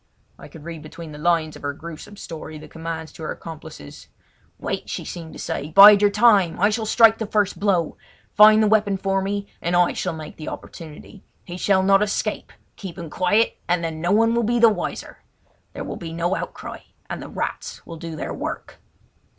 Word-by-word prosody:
I - - -11
could 155 - -13
read 165 -1 -7
between 155 +1 -10
the 150 - -10
lines 160 -1 +1
of - - -12
her 145 0 -3
gruesome 170 +6 -10
story 155 -3 -8
the 150 - -11
commands 160 -1 -6
to - - -13
her 155 - -4
accomplices. 155 - -10 0.5
"Wait," - - -4
she - - -4
seemed 165 -2 -7
to - - -10
say, 145 - -4
"bide 200 +4 +9
your 205 - +5
time. 205 -5 +4
I 205 - +4
shall 220 0 -2
strike 225 0 +5
the 220 - -3
first 205 -2 0
blow. 185 -5 0 0.4
Find 215 +1 +7
the - - +3
weapon 205 -2 +2
for 195 0 0
me, 200 +1 -2 0.2
and 170 +1 0
I 175 0 +3
shall 180 - -3
make 155 -1 -9
the 155 - -6
opportunity! 165 +4 -10 0.2
He 175 - -7
shall 190 +1 +2
not 195 +1 +4
escape! 210 +1 -2 0.3
Keep 190 -3 -8
him 170 -4 -7
quiet, 205 +5 +1
and 175 0 +1
then 160 -1 -4
no 175 +2 0
one 225 +2 +4
will 235 - +2
be 235 +2 +1
wiser. 220 -6 +1 0.5
There - - -6
will - - -6
be 165 -2 -7
no 170 +3 0
outcry, - - -6 0.3
and - - -5
the - - -8
rats - - -5
will 165 - -9
do 165 -1 -7
their - - -5
work!" - - -6
180 Hz, 205 wpm, -22 LUFS, 160-205 Hz, 0.5 s, bide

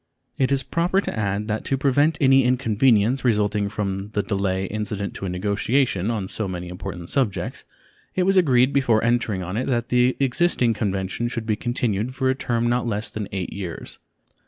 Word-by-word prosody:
It 130 0 +2
is 135 -1 +2
proper 175 +6 +1
to - - -3
add 105 -1 -1
that 110 0 -2
to 135 - +1
prevent 145 +4 +2
any 135 -1 +5
inconvenience 125 -1 +2
resulting 105 -3 +1
from 100 -1 -3
the 105 - 0
delay 95 -2 -1
incident 105 0 -4
to - - -6
a - - -2
negotiation 100 +3 0
on 105 -5 -2
so 110 +1 -2
many 90 -1 -5
important 90 -1 -7
subjects 130 -8 -1 0.5
it 185 - +2
was 195 +1 +2
agreed 135 -7 +4
before 120 -6 +2
entering 115 -5 0
on 95 +4 -4
it 125 - -1
that 120 -2 -1
the 125 +1 +3
existing 135 -3 +2
convention 100 +1 -2
should 115 -2 -4
be 110 -1 +1
continued 120 0 -2
for 130 -1 +1
a - - +2
term 120 -3 -1
not 120 0 0
less 105 -1 -2
than 105 -2 -5
eight 95 -2 -4
years. 95 -4 -7
115 Hz, 185 wpm, -23 LUFS, 100-130 Hz, 0.5 s, any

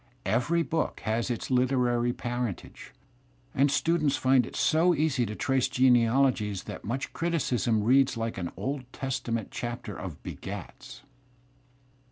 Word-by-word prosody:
Every 125 +12 +1
book 160 0 -2
has 115 +3 -1
its 120 - -3
Kterary 125 -2 +2
parentage, 120 -4 -5 0.6
and 140 +2 +3
students 155 0 +1
find 130 -2 +3
it - - -10
so 170 +3 +3
easy 140 -7 +1
to 105 - -5
trace 135 +2 +1
genealogies 125 -4 +3
that - - -8
much 120 +6 -4
criticism 125 - 0
reads 130 +4 +4
^ - - -7
like 115 -2 -3
an 85 -1 -4
Old 130 -2 -4
Testament 125 -5 -3
chapter 120 -3 -5
of 95 -7 -8
"b^ats." - - -8
125 Hz, 135 wpm, -28 LUFS, 115-135 Hz, 0.6 s, reads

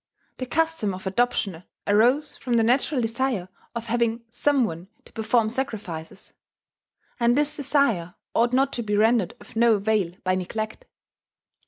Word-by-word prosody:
The 255 - -4
custom 320 -9 0
of 190 - -10
adoption 195 -4 0 0.2
arose 240 +8 +3
from 245 - -3
the 230 - +4
natural 260 +4 +2
desire 230 -4 -1 0.3
of 235 0 -4
having 235 0 0
some 275 +2 +2
one 170 -2 -6 0.2
to - - -18
perform 220 0 +1
sacrifices; 210 -11 -5 0.9
and 240 +1 +3
this 295 0 +1
desire 235 - +1 0.2
ought 235 +1 +3
not 270 +2 +2
to 240 - -2
be 210 -2 -1
rendered 225 0 +3
of - - -16
no 230 0 +5
avail 200 -4 0
by 185 0 +1
neglect. 215 - -4
230 Hz, 150 wpm, -25 LUFS, 205-255 Hz, 0.9 s, no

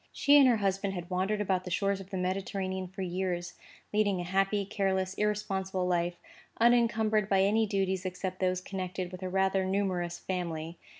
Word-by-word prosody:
She 285 - +4
and 275 - +7
her 240 -3 +4
husband 195 -1 -1
had 175 0 -6
wandered 195 +3 0
about 190 -2 0
the 180 - -6
shores 195 +2 0
of 195 -1 -10
the 195 - -4
Mediterranean 190 0 -2
for 190 +2 -6
years, 175 -1 -2 0.4
leading 205 -3 +2
a - - -2
happy, 195 +3 +1
careless, 190 -2 0
irresponsible 195 -3 -1
life, 175 -1 0 0.4
unencumbered 225 -3 +3
by 195 -1 +4
any 215 +3 +3
duties 190 -2 0
except 185 0 -4
those 185 -1 +1
connected 185 -1 -4
with 185 0 -8
a 185 - -3
rather 190 0 +2
numerous 185 -3 -1
family. 170 -2 -4
190 Hz, 175 wpm, -30 LUFS, 185-200 Hz, 0.4 s, and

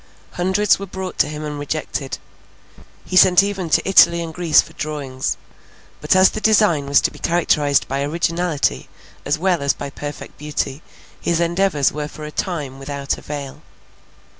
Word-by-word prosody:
Hundreds 190 +4 +2
were 200 - -6
brought 190 0 -6
to - - +4
him 155 0 -6
and 150 -1 -5
rejected. 145 -2 -4 0.9
He - - -5
sent 185 0 +7
even 195 -4 -3
to - - +2
Italy 170 -3 +6
and 165 -1 -7
Greece 170 -2 +4
for - - 0
drawings; 140 -4 -4 0.6
but, - - +2
as 185 0 +6
the 215 - -5
design 205 -9 +3
was 140 0 +4
to - - 0
be - - -14
characterized 150 -4 +1
by 135 +1 -2
originality 165 - -1 0.4
as 145 +3 0
well 175 -1 +1
as 140 -1 +2
by 140 -1 -7
perfect 145 0 -8
beauty, 150 -1 -3 0.4
his 170 -1 0
endeavours 170 -4 +1
were 150 0 -4
for 155 - -11
a 150 - -7
time 150 -8 -4
without 140 0 -4
avail. 140 -2 -7
155 Hz, 165 wpm, -20 LUFS, 145-180 Hz, 0.9 s, sent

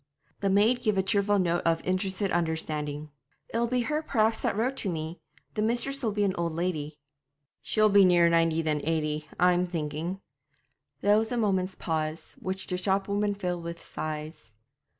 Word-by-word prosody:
The 200 - 0
maid 215 +6 +3
gave 215 -4 +1
a 190 - +3
cheerful 200 +1 +2
note 175 -2 +1
of 165 0 +1
interested 190 +1 0
understanding. 155 -3 -2 0.4
'It'll 235 +1 +1
be 250 +1 +1
her 300 +5 -1
perhaps 220 -6 +1
that - - 0
wrote 245 +5 0
to 200 - -2
me; 160 0 -4 0.3
the 210 - -1
mistress'll 240 +3 +1
be 205 0 0
an 195 -2 +2
old 170 -1 -1
lady.' 160 -3 -2 0.6
'She'll 215 -1 +3
be 200 -1 +7
nearer 175 -2 +5
ninety 165 -1 +2
than 150 -2 0
eighty, 155 -1 -1
I'm 180 0 +4
thinking.' 165 +2 -3 0.8
There 205 +1 +5
was 220 +1 -2
a 245 - -1
moment's 190 -4 +1
pause, 155 0 -3
which 190 0 -4
the 180 - -2
shop 195 +1 0
woman 205 0 0
filled 180 -3 -3
with 170 0 -7
sighs. 155 -4 -6
185 Hz, 170 wpm, -28 LUFS, 165-205 Hz, 0.8 s, be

